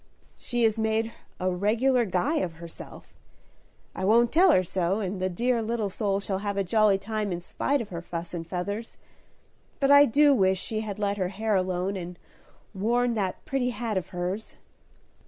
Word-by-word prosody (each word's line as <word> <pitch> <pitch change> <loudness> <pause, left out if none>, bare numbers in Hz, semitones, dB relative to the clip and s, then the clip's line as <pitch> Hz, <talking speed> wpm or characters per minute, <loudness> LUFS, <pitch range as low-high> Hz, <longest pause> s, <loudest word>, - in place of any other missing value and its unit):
"She 240 -1 -2
has 225 0 +2
made 220 +1 0 0.3
a 185 0 0
regular 230 +7 +2
guy 205 - 0
of 180 - -1
herself; 165 0 -11 0.8
I 190 - -5
won't 230 +4 +4
tell 360 +5 +5
her 185 - +4
so, 185 +2 0
and 190 -2 -3
the 185 - +1
dear 235 +6 0
little 220 -2 -2
soul 200 0 0
shall 195 -1 -2
have 200 0 -3
a 200 - +2
jolly 210 +1 +3
time 210 0 -3
in 175 - -2
spite 280 +10 -1
of 220 - -7
her 170 -2 -5
fuss 170 0 -6
and 165 -2 -5
feathers. 200 +6 -4 0.8
But 275 0 +3
I 285 0 +9
do 290 +3 +5
wish 190 -6 +2
she 215 +3 -3
had 210 -2 -5
let 205 -1 -1
her 185 -2 -1
hair 215 +3 -2
alone 185 0 0
and 175 -1 -7 0.6
worn 235 +5 +1
that 195 -4 -3
pretty 260 -2 0
hat 235 -3 -3
of 185 - -2
hers." 180 +4 -4
205 Hz, 185 wpm, -27 LUFS, 185-230 Hz, 0.8 s, I